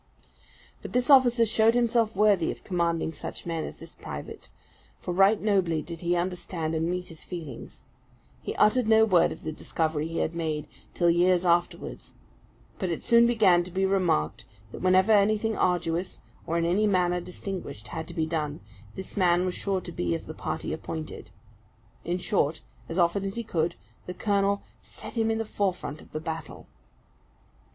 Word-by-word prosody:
But - - -8
this 250 +3 +2
officer 245 -3 +6
showed 220 +1 +3
himself 230 -2 +2
worthy 200 -4 +3
of - - -10
commanding 170 -3 -1
such 145 - -7
men 165 -2 -2
as - - -7
this - - -11
private; - - -8 0.5
for 180 - -4
right 195 +3 +5
nobly 185 -7 +1
did 170 -1 -8
he 175 0 +1
understand 175 -2 -2
and 160 +1 0
meet 180 0 -3
his 165 -2 -11
feelings. 160 -9 -8 0.6
He - - -5
uttered 225 +2 +3
no 220 0 +6
word 185 -6 +4
of - - -9
the 155 - -3
discovery 155 0 -2
he 165 - -5
had 160 - 0
made, 160 -3 -2 0.3
till 175 -1 +4
years 180 +1 +3
afterwards; 175 0 -1 0.6
but 185 - -1
it 165 - -3
soon 235 0 +5
began 200 -7 +4
to 180 - -8
be 190 +2 0
remarked 120 - +1 0.3
that - - -8
whenever 185 +3 +4
anything 215 +1 +3
arduous, 175 0 0 0.3
or 165 +1 0
in 165 - +1
any 195 +5 +2
manner 180 -2 +2
distinguished, 180 - -7
had 160 -1 -5
to 170 - -9
be 160 -2 +1
done, 155 -2 -3 0.4
this 190 - -8
man 180 -2 +3
was 180 - -1
sure 195 -1 -1
to 175 - -8
be 85 - -1
of - - -6
the - - -7
party - - -4
appointed. 160 -1 -6 0.7
In 175 +1 -1
short, 165 -5 0 0.3
as 165 - -4
often 175 +2 +2
as 195 0 -3
he 235 - -2
could, 170 -5 -1 0.3
the 180 - -5
colonel 200 0 +1 0.2
"set - - -10
him 225 -1 +1
in 225 - +1
the 225 - -2
forefront 185 -8 -2
of - - -17
the 155 - -3
battle." 160 -1 -6
180 Hz, 180 wpm, -27 LUFS, 165-200 Hz, 0.7 s, officer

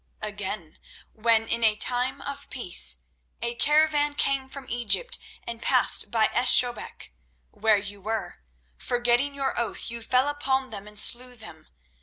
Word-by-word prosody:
Again, 205 -5 -6 0.3
when 225 0 +2
in 230 +1 0
a 215 -1 +4
time 245 +4 0
of 280 0 -7
peace 175 - -1 0.4
a 235 0 -3
caravan 295 +2 +2
came 275 -2 0
from 265 0 -10
Egypt 240 - 0 0.3
and 235 -1 -7
passed 255 -4 +3
by 220 0 +1
Esh 245 +1 +5
Shobek, 240 - -4 0.4
where 220 0 +2
you 200 0 -5
were, 220 - -5 0.4
forgetting 245 +3 0
your 275 -1 -2
oath, 235 0 -2
you 235 0 -7
fell 255 +4 +1
upon 270 -3 -1
them 205 -1 -6
and 210 0 -11
slew 250 +3 +3
them. 170 -9 -11
235 Hz, 150 wpm, -25 LUFS, 215-265 Hz, 0.4 s, Esh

